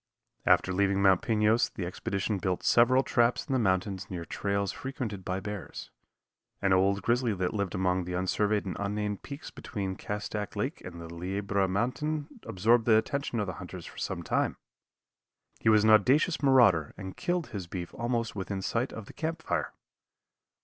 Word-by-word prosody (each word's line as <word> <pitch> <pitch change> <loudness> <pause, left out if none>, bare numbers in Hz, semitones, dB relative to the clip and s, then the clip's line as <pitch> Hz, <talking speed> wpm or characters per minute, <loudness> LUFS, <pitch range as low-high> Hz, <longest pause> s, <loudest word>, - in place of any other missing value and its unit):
After 95 - +4
leaving 100 +1 +2
Mount 95 -2 +5
Pinos 110 0 +2
the 90 - -5
expedition 100 +3 -2
built 90 0 -1
several 130 +3 +5
traps 120 -1 +2
in 140 - -3
the 130 - +3
mountains 95 -1 0
near 85 -3 -5
trails 100 +1 -1
frequented 115 -7 -5
by 90 +1 -2
bears. 105 -1 -7 0.7
An 100 -1 +2
old 100 +1 +3
grizzly 120 -2 +1
that 90 -1 -1
lived 100 -2 -2
among 90 -1 +1
the 90 - -5
unsurveyed 100 +3 +1
and 90 -4 -4
unnamed 105 0 -2
peaks 145 +2 -8
between 95 -4 -4
Castac 105 +1 -4
Lake 115 +9 -2
and 85 -2 -8
the 85 - -7
Liebra 95 +3 -1
Mountain 145 - -2
absorbed 115 +3 +3
the 110 -2 +6
attention 120 +1 -1
of 105 - 0
the 95 - -4
hunters 90 -1 -8
for - - -10
some - - -3
time. - - 0 1.0
He 110 - +2
was 105 -1 +5
an 110 - +5
audacious 135 - +4
marauder 120 - +4
and 95 -2 -7
killed 175 -2 -1
his 95 -5 -5
beef 85 -1 -6
almost 120 -2 -2
within 95 -1 -4
sight 120 +6 -1
of 110 - -7
the - - -12
camp 165 0 -3
fire. - - -1
100 Hz, 175 wpm, -29 LUFS, 95-120 Hz, 1.0 s, the